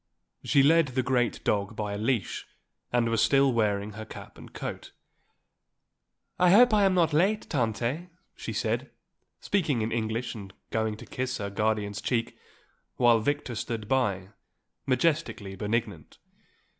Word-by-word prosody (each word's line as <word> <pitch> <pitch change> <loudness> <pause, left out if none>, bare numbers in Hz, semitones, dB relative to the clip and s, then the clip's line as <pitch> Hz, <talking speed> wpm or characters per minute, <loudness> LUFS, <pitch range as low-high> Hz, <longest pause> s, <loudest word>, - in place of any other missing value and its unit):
She 140 - +4
led 165 +2 +5
the 130 0 -1
great 125 -2 0
dog 100 +1 0
by 105 -1 -3
a - - -3
leash 115 -1 -1 0.4
and 120 -1 +2
was 115 -1 +1
still 135 -1 +4
wearing 105 -2 0
her 110 +2 -7
cap 110 - -11
and - - -13
coat. - - -7 1.5
"I 180 0 +5
hope 230 +5 +7
I 205 -2 +5
am 190 -1 +3
not 165 -3 +3
late, 195 +7 +2
Tante," 125 +5 -1 0.3
she - - -6
said, - - -1 0.5
speaking 150 - 0
in 110 - -2
English 115 +1 -2
and 100 -4 -9 0.2
going 110 -1 -1
to - - -11
kiss 130 +1 -3
her 100 -1 -4
guardian's 105 -1 -1
cheek, 115 -3 -1 0.6
while 120 -2 +5
Victor 145 +1 -1
stood 110 -1 -4
by, 100 -8 0 0.6
majestically 130 -8 0
benignant. 105 -5 -3
115 Hz, 145 wpm, -28 LUFS, 105-140 Hz, 1.5 s, hope